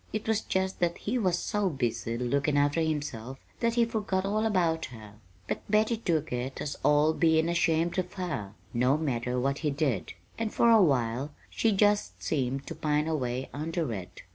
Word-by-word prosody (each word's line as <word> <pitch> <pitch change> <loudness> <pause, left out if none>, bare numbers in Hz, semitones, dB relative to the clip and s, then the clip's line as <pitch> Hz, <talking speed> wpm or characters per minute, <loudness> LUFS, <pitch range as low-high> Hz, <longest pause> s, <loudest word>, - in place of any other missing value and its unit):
It 215 0 -4
was 220 -1 +2
just 190 0 -1
that 175 -1 +1
he 245 +4 -1
was 185 -5 +2
so 205 0 0
busy 120 -5 -2
lookin' 140 +4 +1
after 145 +3 +2
himself 145 -6 -3 0.2
that 230 -1 +1
he 235 -1 +4
forgot 205 -4 -1
all 215 +2 +1
about 170 -6 +1
her. 110 -4 -11 0.3
But - - -2
Betty 215 +2 +3
took 160 - -1
it 125 +2 -3 0.2
all 150 +1 +4
as - - -6
bein' 160 -1 +3
ashamed 170 0 +1
of 180 -1 -3
her, 145 - -4 0.2
no 125 +4 +3
matter 125 -5 -1
what 135 +2 0
he 155 - 0
did; 140 - -1 0.3
and 225 -1 -1
for 235 - +4
a 225 -2 +7
while 135 -2 +1 0.2
she 225 - +2
just 205 +1 +2
seemed 135 -2 -1
to - - -5
pine 150 0 0
away 130 -4 -1
under 155 -2 -2
it. 90 -3 -8
155 Hz, 185 wpm, -29 LUFS, 130-190 Hz, 0.3 s, a